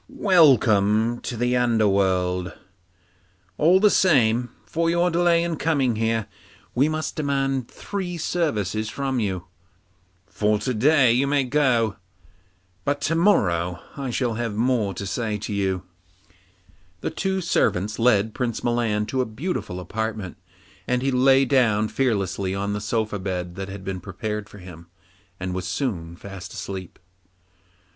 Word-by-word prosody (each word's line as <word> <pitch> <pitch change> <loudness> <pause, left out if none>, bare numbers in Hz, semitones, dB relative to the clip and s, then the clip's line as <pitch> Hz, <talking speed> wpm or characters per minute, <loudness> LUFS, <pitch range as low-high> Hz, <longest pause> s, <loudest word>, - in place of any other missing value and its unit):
Welcome 120 - +4
to 120 - -5
the 125 +2 +1
underworld! 95 -6 +1 1.1
All 175 +5 +5
the 210 0 +5
same, 120 -8 +3 0.2
for 165 0 0
your 170 +1 +2
delay 170 0 +3
in 170 -2 -2
coming 140 -8 +1
here, 115 -1 0 0.5
we 140 +5 +3
must 155 0 -3
demand 135 -4 -1
three 185 -3 -5
services 110 - -1
from 135 +1 -2
you. 95 -5 -2 0.8
For 105 +1 0
to 110 +5 -2
day 130 +2 +4
you 130 +3 +2
may 140 -1 +2
go, 125 -6 +1 0.9
but 145 0 0
to 155 - 0
morrow 90 - +2 0.2
I 135 -2 -4
shall 120 -1 -1
have 115 -1 -3
something 110 +3 0
more 110 -7 0
to 100 - -5
say 105 +2 -2
to 105 0 -5
you.' 95 -2 -1 1.2
Then - - -2
two 190 0 -1
servants 105 - 0
led 110 -2 +3
Prince 120 -3 -3
Milan 115 -3 0
to 130 +4 -1
a - - 0
beautiful 110 - -4
apartment, 105 +1 -4 0.5
and 125 0 0
he 135 - +1
lay 135 +1 +4
down 115 -5 +2
fearlessly 100 -6 -1
on 100 +1 -2
the 105 - -3
soft 105 -2 -2
bed 90 -2 -3
that 95 +1 -6
had 95 0 -8
been 95 -1 -4
prepared 105 +3 -5
for - - -13
him, 90 -3 -12 0.5
and 90 0 -3
was 90 -1 -3
soon 90 - -3
fast 95 +1 -9
asleep. 95 -3 -6
115 Hz, 145 wpm, -23 LUFS, 100-135 Hz, 1.2 s, All